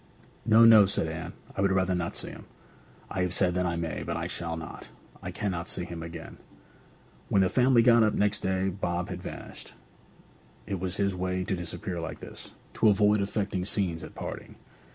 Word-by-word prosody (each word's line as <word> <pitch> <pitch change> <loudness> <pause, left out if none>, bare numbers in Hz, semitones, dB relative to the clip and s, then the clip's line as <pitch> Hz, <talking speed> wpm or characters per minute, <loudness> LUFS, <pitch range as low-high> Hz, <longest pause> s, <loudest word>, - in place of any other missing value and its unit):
'No, 115 +1 +7
no,' 110 -3 +8
said 95 - +1
Anne. 80 0 -5 0.2
'I - - -1
would 100 -1 +3
rather 95 -1 +2
not 85 -1 -2
see - - -5
him! - - -11 0.7
I 95 - -1
have 90 -1 0
said 90 -2 +3
that 90 0 0
I 85 - -1
may. 85 -2 -3
But - - -3
I - - -3
shall 85 -1 -2
not. 80 -2 -8 0.3
I - - -5
cannot 90 -4 -3
see 90 - -1
him 85 -1 -7
again!' 85 0 -8 0.9
When 95 - +4
the 95 - +2
family 125 0 +4
got 115 -1 +6
up 110 -1 +3
next 105 +1 +1
day 95 0 0
Bob 90 -2 -2
had - - -5
vanished. - - -9 0.9
It 100 -3 -3
was 95 0 -2
his 100 -1 0
way 90 0 -1
to 95 - -1
disappear 85 0 -4
like 80 - -6
this, - - -9 0.3
to 110 - +7
avoid 105 0 +4
affecting 100 -2 -1
scenes 90 -5 0
at - - -10
parting. - - -7
95 Hz, 195 wpm, -28 LUFS, 85-100 Hz, 0.9 s, no